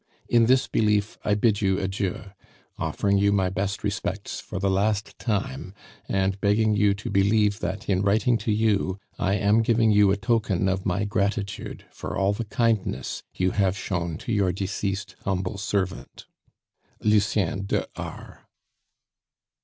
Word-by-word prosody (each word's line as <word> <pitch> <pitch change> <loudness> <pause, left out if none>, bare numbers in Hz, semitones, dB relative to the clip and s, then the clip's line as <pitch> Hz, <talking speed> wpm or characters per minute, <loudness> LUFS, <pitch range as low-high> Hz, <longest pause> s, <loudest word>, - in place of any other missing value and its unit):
In 115 -1 +4
this 130 +1 +4
belief 105 -1 +1
I 105 - +2
bid 105 0 +2
you 95 -2 +2
adieu, 95 0 -3 0.5
offering 100 -1 +1
you 100 0 +3
my 95 -2 +1
best 100 +2 -2
respects 100 -1 -3
for 100 - -7
the 100 +1 0
last 100 +2 0
time, 95 - -3 0.3
and 95 0 0
begging 105 +1 +3
you 100 -1 +3
to 105 - -6
believe 105 +1 +3
that 95 +2 -4
in 95 -2 +2
writing 110 +5 +3
to 110 - -1
you 105 -3 +1 0.2
I 95 +2 +1
am 105 +3 +3
giving 115 -1 +3
you 105 -1 +5
a 100 - +2
token 110 -4 +1
of 95 +1 -1
my 95 +3 0
gratitude 100 0 -2
for - - -6
all 100 +1 +2
the 115 +3 -4
kindness 110 - -1
you 90 0 +1
have 95 -1 +1
shown 85 -5 -3
to - - -2
your 100 -4 +2
deceased 95 +2 -3
humble 95 +1 -2
servant, 100 -2 -3 0.8
"LUCIEN 100 -3 +2
DE - - 0
R." - - -9
100 Hz, 155 wpm, -25 LUFS, 95-105 Hz, 0.8 s, you